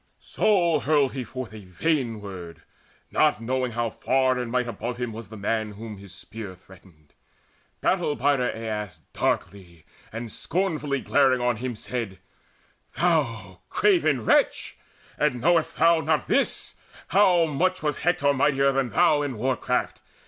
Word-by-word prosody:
So 175 -7 +2
hurled 145 -2 +2
he 130 -2 -3
forth 125 -1 -7
a 110 -2 -10
vain 115 - -1
word, 90 -5 -9 0.5
knowing 115 - +2
not 130 0 -1
How 120 -1 -1
far 130 +1 +1
in 120 - -4
might 125 0 0
above 120 +2 -4
him 120 -2 -3
was 110 -2 -9
the 110 - -9
man 110 +1 -2
Whom 105 0 -8
his 100 -2 -12
spear 100 0 -9
threatened. 90 -5 -20 0.7
Battle 175 -6 +1
bider 135 0 +2
Aias 105 -7 -5
Darkly 85 -5 -3 0.3
and 115 0 -6
scornfully 155 - -1
glaring 135 -2 +3
on 120 -1 0
him, 125 +1 -4
said 110 -3 -4 0.8
"Thou 115 - 0
craven 155 - +2
wretch, - - +2 0.4
and 150 -5 +1
knowest 165 +4 +2
thou 165 0 +5
not 155 -1 0
this, - - 0 0.3
How 180 -2 +5
much 180 +5 0
was 150 -2 0
Hector 145 -4 +2
mightier 140 0 +3
than 135 -2 0
thou 155 +1 +3
In 140 -5 -3
war 130 +4 0
craft? - - -2
125 Hz, 150 wpm, -25 LUFS, 110-150 Hz, 0.8 s, thou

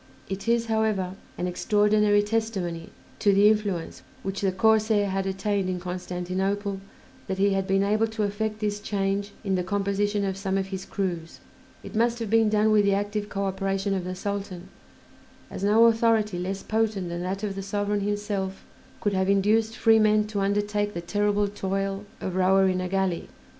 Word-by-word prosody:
It 195 +2 -5
is, 235 0 +2
however, 220 -5 0 0.2
an 180 - -2
extraordinary 205 +2 +3
testimony 205 -6 -2 0.3
to 205 - +4
the 200 +1 +6
influence 205 -6 -1 0.2
which 195 -2 -3
the 195 -2 +2
corsair 215 +1 +3
had 195 0 -1
attained 195 0 -1
in 180 -1 -2
Constantinople 185 +2 -3 0.5
that 190 - -2
he 200 +1 +3
had 195 0 0
been 195 0 +2
able 215 +2 +2
to 220 -1 -3
effect 215 +1 -2
this 205 -1 -1
change 200 0 -1
in 195 -2 -1
the 180 -1 +1
composition 200 +1 0
of 190 -1 -2
some 195 -1 -1
of 195 0 -2
his 190 -1 -5
crews; 175 -4 -4 0.4
it - - -9
must 235 +1 +2
have 225 -3 -4
been 225 -1 +4
done 215 +1 +3
with 210 -1 +5
the 200 -1 +3
active 205 +1 -2
coöperation 195 0 -1
of 185 - -2
the 185 0 -4
Sultan, 195 -2 -5 0.8
as - - -6
no 215 +3 +5
authority 225 -4 +3
less 190 +2 -3
potent 215 -5 -1
than 170 0 -4
that 190 +3 -3
of 205 -2 -2
the 195 - -5
sovereign 205 +1 -1
himself 205 -2 -3 0.4
could 205 - 0
have 190 0 +1
induced 215 +3 +2
free 225 -1 +5
men 215 0 +4
to 210 -1 -3
undertake 205 +1 0
the 170 - -3
terrible 205 +3 +1
toil 195 0 -3
of 185 - -4
rower 190 +1 +4
in 185 -1 0
a 180 - -3
galley. 190 -2 -1
200 Hz, 180 wpm, -26 LUFS, 190-210 Hz, 0.8 s, the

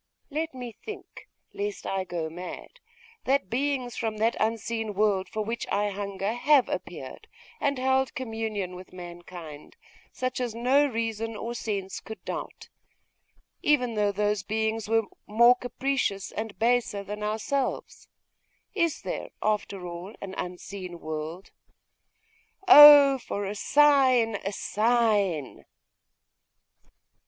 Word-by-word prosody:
Let 315 0 -3
me 245 -2 -6
think, 410 - -11 0.2
lest 410 0 -4
I 190 -1 -2
go 170 -3 -3
mad, 180 - -9 0.5
that 265 -8 +1
beings 255 -1 -1
from 220 -2 -3
that 225 +2 +1
unseen 225 -1 -2
world 200 -2 +1
for 215 - -3
which 230 +2 -4
I 205 0 +1
hunger 200 +1 -3
have 270 +2 +4
appeared, - - -6 0.3
and 280 -2 0
held 265 +1 +1
communion 220 -6 -3
with 180 +1 -12
mankind, 175 - -10 0.4
such 255 0 -3
as 240 -3 -3
no 260 +5 +3
reason 225 -2 -3
or 230 +2 -5
sense 200 -5 -4
could 220 - -10
doubt - - -6 0.9
even 250 -6 +2
though 210 -1 +1
those 205 0 0
beings 220 +1 -2
were 225 0 +3 0.2
more 235 +3 +6
capricious 245 -5 -2
and 220 -1 -5
baser 230 -3 +1
than 210 +1 -6
ourselves! 220 +6 -2 0.7
Is 335 -6 0
there, - - -4
after 205 -3 -1
all, 175 +4 -7
an 195 -1 -7
unseen 180 0 -6
world? 155 +4 -6 1.2
Oh 290 -2 +10
for 205 -4 -4
a 195 - -3
sign, 255 -3 +4
a 195 - -4
sign! 210 - +1
220 Hz, 125 wpm, -27 LUFS, 195-250 Hz, 1.2 s, Oh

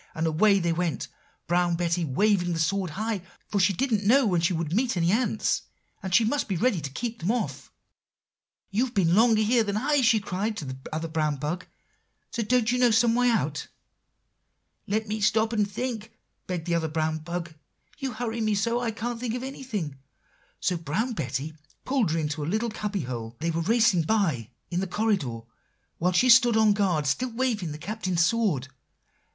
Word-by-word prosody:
And 160 - -1
away 195 +6 +4
they 170 -2 0
went, 165 -6 -2 0.4
Brown 175 +1 +2
Betty 170 0 0
waving 175 +4 +2
the 165 - -2
sword 190 +2 0
high; 215 -2 -2 0.3
for 205 - -1
she 190 +1 +4
didn't 220 +1 0
know 255 +6 +5
when 180 -5 +2
she 170 +3 +2
would 165 -2 -2
meet 235 0 +1
any 170 +1 +2
ants, 220 -1 +1 0.4
and 190 -2 -5
she 225 +5 +5
must 285 +6 0
be 190 - -1
ready 210 -4 +1
to 140 - -4
keep 230 - -4
them 175 - -2
off. 240 -1 -3 1.0
"'You've 235 +4 0
been 185 -5 +3
here 170 - +4
longer 225 +1 +4
than 205 -1 -2
I,' 285 +4 +2
she 230 -3 +4
cried 205 +2 -3
to 160 - -5
the 130 -1 -6
other 160 +1 -3
brown 155 -2 0
bug; 155 +6 -4 0.7
'don't 235 +1 +1
you 250 - +1
know 245 -1 +5
some 230 +1 +4
way 245 +1 +3
out?' 150 -10 -1 1.2
"'Let 215 +2 -1
me 215 +1 -3
stop 220 +2 +2
and 210 -2 +1
think,' 225 +1 -4 0.4
begged 175 -3 -3
the 175 - -1
other 165 -1 +1
brown 155 0 -1
bug; 170 0 -5 0.5
'you 270 -3 -3
hurry 230 0 -3
me 215 -1 +1
so 230 +4 +1
I 240 -1 -1
can't 230 +1 -4
think 240 -1 -2
of 250 - -4
anything.' 215 - -5 0.6
So 180 - 0
Brown 170 - -2
Betty 150 - -3 0.3
pulled 260 -8 +1
her 160 - 0
into 150 -1 -2
a - - -3
little 220 +4 0
cubby 210 -2 -3
hole, 120 -3 -6
they 165 +2 -1
were 165 +1 -1
racing 220 -2 +3
by, 155 - 0 0.2
in 175 - 0
the 190 - -1
corridor, 180 - -1 0.6
while 180 +2 +2
she 185 +8 +3
stood 240 -1 +7
on 215 -1 +5
guard, 185 -7 +1
still 250 - 0
waving 225 -8 -1
the 150 - -6
Captain's 185 -1 0
sword. 185 - +1
200 Hz, 190 wpm, -26 LUFS, 165-230 Hz, 1.2 s, stood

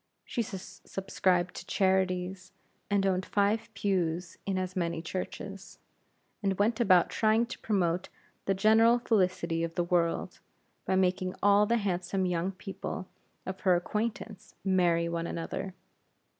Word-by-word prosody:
She 240 - -2
subscribed 185 -2 -1
to - - -7
charities, 185 -1 0 0.4
and 200 -1 +2
owned 190 -1 +1
five 210 +4 +1
pews 180 -4 -1
in 195 -1 0
as 185 0 -3
many 170 -3 -1
churches, 190 +3 -6 0.6
and 195 -2 0
went 220 +3 +2
about 185 -7 +5
trying 220 +1 +3
to 235 - -8
promote 185 -4 0 0.4
the 195 - +1
general 220 +4 +5
felicity 185 -7 +1
of 165 0 -3
the 175 - +1
world, 170 -1 0 0.5
by 190 - +1
making 185 0 +1
all 205 +1 +5
the 235 +2 +3
handsome 190 -2 -1
young 180 +1 0
people 185 0 -6 0.4
of 190 0 -5
her 185 -3 +4
acquaintance 210 +2 -3
marry 175 -3 +3
one 170 0 -2
another. 180 +3 -4
190 Hz, 135 wpm, -30 LUFS, 180-205 Hz, 0.6 s, about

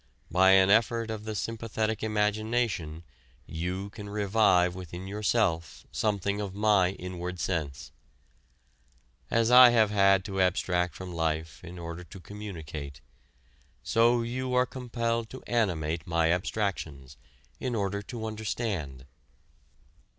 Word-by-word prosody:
By 95 +2 +6
an 95 0 +6
effort 115 +1 +2
of 110 -1 -6
the 110 -1 -4
sympathetic 110 0 -2
imagination 105 -6 -1 0.4
you 90 +5 -4
can 105 -2 -9
revive 100 -3 +3
within 90 0 -8
yourself 100 -4 -1
something 100 -1 -1
of 100 -2 -5
my 100 -3 +3
inward 90 -1 -6
sense. 75 -5 -3 1.4
As 115 +1 +2
I 125 0 +10
have 110 -3 +3
had 100 -2 +4
to 95 -2 -1
abstract 90 -1 +1
from 90 -1 -7
life 80 -1 -2
in 90 +2 -9
order 85 +1 -7
to 90 +3 -12
communicate, 80 -9 -8 0.8
so 120 +1 +3
you 125 +2 -3
are 125 0 +4
compelled 115 -2 -3
to 130 - -10
animate 85 -7 -1
my 85 -1 +2
abstractions, 80 -8 -3 0.4
in 125 -2 -2
order 100 -1 -1
to 110 +2 -7
understand. 105 - -4
100 Hz, 120 wpm, -28 LUFS, 90-110 Hz, 1.4 s, I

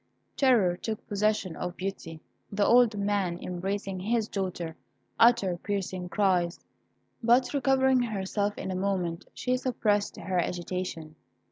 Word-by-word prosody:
Terror 225 -10 +3
took 220 +2 -5
possession 205 -4 0
of 175 0 -5
Beauty. 185 -4 -5 0.3
The 200 0 +1
old 235 -3 +5
man, 200 -3 0
embracing 190 +1 -3
his 220 +3 0
daughter, 180 -5 -3 0.4
uttered 200 -7 +4
piercing 185 -3 -3
cries. 180 -2 +1 0.6
But 245 +3 +3
recovering 265 -1 +3
herself 205 -2 -2
in 190 - -4
a - - -2
moment, 185 -2 -2
she 250 0 0
suppressed 215 -5 0
her 185 +1 -1
agitation. 175 -2 -4
195 Hz, 125 wpm, -28 LUFS, 180-220 Hz, 0.6 s, old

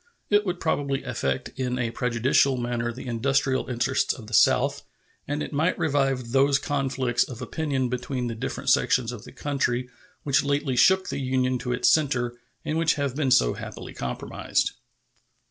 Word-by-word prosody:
It 205 0 +3
would 180 -1 -2
probably 140 -3 -1
affect 70 - -2
in 125 -1 -3
a 120 -2 -1
prejudicial 125 +3 +2
manner 120 -1 -2
the 125 - -9
industrial 130 +2 0
interests 125 +2 0
of 115 - -11
the 110 - -11
South, - - +4 0.5
and 145 +1 -2
it - - -7
might 155 +5 +1
revive 135 -6 0
those 135 +2 +4
conflicts 135 -5 0
of 125 -3 -9
opinion 135 0 -1
between 125 +1 -3
the 120 - -2
different 110 - -2
sections 125 -2 +2
of 120 -4 -9
the - - -11
country 130 -3 -1 0.3
which 140 -2 +2
lately 140 -2 0
shook 190 +9 +4
the - - -3
Union 130 -1 0
to 125 0 -3
its 125 0 +1
center, 130 -6 +2 0.3
and 155 +1 -1
which 165 -1 +3
have 140 -3 -2
been 145 -2 0
so - - +4
happily - - -8
compromised. 60 -1 -2
130 Hz, 170 wpm, -25 LUFS, 120-140 Hz, 0.5 s, South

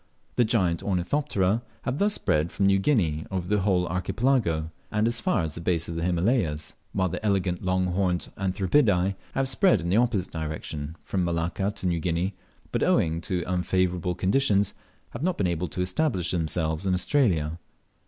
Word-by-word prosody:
The 120 - +4
giant 95 -7 +1
Ornithopterae 100 +1 0 0.2
have 130 +3 -2
thus 205 +1 +2
spread 75 +2 +1
from 100 - 0
New 95 0 +4
Guinea 85 - +1
over 95 -2 -3
the 105 +2 +2
whole 95 -2 +2
Archipelago, 90 -3 0 0.2
and 105 +1 +1
as 120 0 0
far 85 - +1
as 80 -2 -3
the 85 - -6
base 85 -1 0
of 85 - -4
the 85 - -2
Himalayas; 85 - 0 0.2
while 95 -2 +1
the 90 - -5
elegant 95 -4 0
long 95 0 +1
horned 90 -1 0
Anthribidae 95 0 +2 0.2
have 135 0 +1
spread 115 -4 +4
in 85 +1 -3
the 95 - +3
opposite 115 -6 +1
direction 80 -1 -5
from 95 -2 -1
Malacca 85 +3 -1
to 95 - -6
New 85 -1 +1
Guinea, 85 +4 -1 0.4
but - - -1
owing 80 0 +2
to 90 0 -2
unfavourable 90 -1 0
conditions 100 0 +2 0.4
have 115 - -7
not 180 +2 0
been 95 - +1
able 90 0 -1
to 90 +4 -4
establish 90 - 0
themselves 80 0 -1
in 95 - +3
Australia. 90 - +1
90 Hz, 175 wpm, -26 LUFS, 85-105 Hz, 0.4 s, The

